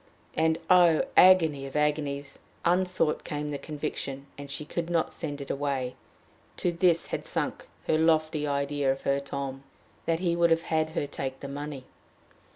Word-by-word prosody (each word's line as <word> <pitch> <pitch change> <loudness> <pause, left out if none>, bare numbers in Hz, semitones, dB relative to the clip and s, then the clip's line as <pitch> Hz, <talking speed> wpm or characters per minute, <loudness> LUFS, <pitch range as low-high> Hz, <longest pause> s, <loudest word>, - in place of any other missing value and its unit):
And, 160 0 +2
oh, 175 -3 +6
agony 160 -7 +6
of 135 - -11
agonies! 145 -2 -1 0.3
unsought 180 -2 +2
came 150 0 -4
the 140 - -3
conviction, 145 -3 -5
and 140 0 -9
she 140 +2 -5
could 170 +2 -3
not 170 -2 0
send 145 -2 -5
it 140 - -4
away 135 -3 -2 0.6
to 180 - 0
this 170 -1 +3
had - - -1
sunk - - -3 0.2
her 155 - +2
lofty 155 -2 +2
idea 140 -1 0
of 135 - -4
her 140 0 +2
Tom! 140 -1 -5 0.5
that 165 0 +2
he 175 -2 +1
would 170 0 +4
have 165 0 +3
had 160 -1 0
her - - +1
take 135 -2 -5
the 140 - -5
money! 140 -1 -6
150 Hz, 165 wpm, -28 LUFS, 140-165 Hz, 0.6 s, oh